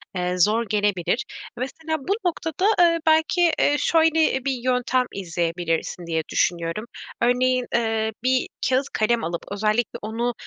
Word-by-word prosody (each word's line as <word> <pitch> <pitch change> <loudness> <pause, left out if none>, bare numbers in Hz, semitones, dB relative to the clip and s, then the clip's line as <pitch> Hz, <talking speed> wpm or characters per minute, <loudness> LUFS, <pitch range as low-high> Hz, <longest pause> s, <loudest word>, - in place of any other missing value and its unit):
eee, 180 0 -1
zor 215 +6 +3
gelebilir. 205 +1 0 0.3
Mesela 315 +6 -3
bu 360 +9 -1
noktada, 330 +1 -1
eee, 335 -1 +5
belki, 320 +2 +4
eee, 290 - +3
şöyle 320 -5 +2
bir 275 - +1
yöntem 250 0 0
izleyebilirsin 170 -1 -2
diye 160 -1 0
düşünüyorum. 170 +5 0 0.4
Örneğin, 250 +1 +2
eee, 230 -1 +1 0.3
bir 255 0 +2 0.2
kâğıt 260 +1 +2
kalem 230 +2 +1
alıp 170 +1 -3
özellikle 215 +3 0
onu, 230 +3 -2
240 Hz, 130 wpm, -23 LUFS, 195-275 Hz, 0.4 s, eee